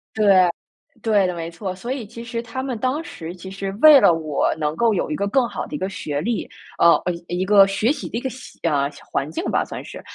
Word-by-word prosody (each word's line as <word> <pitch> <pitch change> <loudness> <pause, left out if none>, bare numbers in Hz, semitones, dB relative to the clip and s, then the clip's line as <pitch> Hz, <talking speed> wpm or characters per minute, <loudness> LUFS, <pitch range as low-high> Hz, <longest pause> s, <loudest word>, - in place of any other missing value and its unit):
对， 215 - +1 0.8
对 205 -4 +3
的， 180 - -3
没 165 0 -5
错。 185 +2 -5
所 235 +7 -6
以 255 -5 -4
其 230 +2 -9
实 230 0 -4
他 250 +3 -5
们 255 -4 -3
当 260 +7 -1
时 170 - -8
其 190 +1 -10
实 195 0 -4
为 305 -3 +9
了 175 - +5
我 155 -3 0
能 150 -1 -2
够 230 +3 +2
有 175 - -1
一 - - 0
个 200 +4 -1
更 250 +3 +2
好 - - -5
的 - - -7
一 - - -2
个 190 - -2
学 145 -6 -4
历， 230 +4 -2 0.3
呃， 170 0 +6 0.3
一 175 +1 -3
一 185 - 0
个 200 -1 +6
学 210 +5 +1
习 305 - -4
的 230 - -4
一 - - -3
个 265 - -2
习 255 0 -12
呃， 145 -4 +1 0.2
环 140 +2 -1
境 160 - -4
吧， - - +1
算 - - -7
是， - - -10
200 Hz, 270 characters per minute, -22 LUFS, 170-235 Hz, 0.8 s, 为